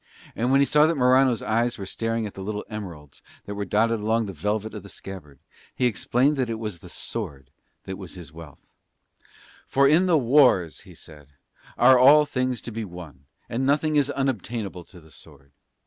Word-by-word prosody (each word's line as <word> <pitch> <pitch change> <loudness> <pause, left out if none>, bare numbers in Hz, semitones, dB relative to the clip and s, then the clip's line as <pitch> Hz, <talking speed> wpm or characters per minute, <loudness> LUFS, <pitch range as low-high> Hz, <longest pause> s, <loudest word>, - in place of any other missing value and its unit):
And 120 +2 -1
when 135 +1 +4
he - - +5
saw 150 +2 +4
that 165 - 0
Morano's 130 -2 +3
eyes 120 +2 0
were 100 - -6
staring 115 +3 -3
at 105 - -7
the 95 - -9
little 105 +2 -5
emeralds 85 -10 -9 0.2
that 100 - -6
were 100 0 -4
dotted 110 +4 +1
along 110 +2 0
the 100 - -7
velvet 105 +6 -3
of 105 - -7
the 100 - -13
scabbard 85 -10 -10 0.4
he 125 - 0
explained 125 +5 +1
that 130 -3 -1
it 115 - -3
was 105 -6 -6
the - - -13
sword 65 -2 -6 0.3
that 95 0 -7
was 95 -2 -9
his 85 -4 -10
wealth: 80 -4 -14 0.9
"For 140 +1 +3
in 165 +6 +4
the 170 -3 +4
wars," 125 - +3
he - - -14
said, 75 -3 -15 0.4
"are 125 +1 +6
all 145 +4 +7
things 130 -3 -2
to 120 - -8
be 115 0 -4
won, 85 -7 -11 0.2
and 120 +3 -3
nothing 150 +3 +1
is 145 -1 +2
unobtainable 115 -9 -3
to 90 - -15
the 80 -1 -19
sword. 70 -1 -15
110 Hz, 195 wpm, -24 LUFS, 90-130 Hz, 0.9 s, all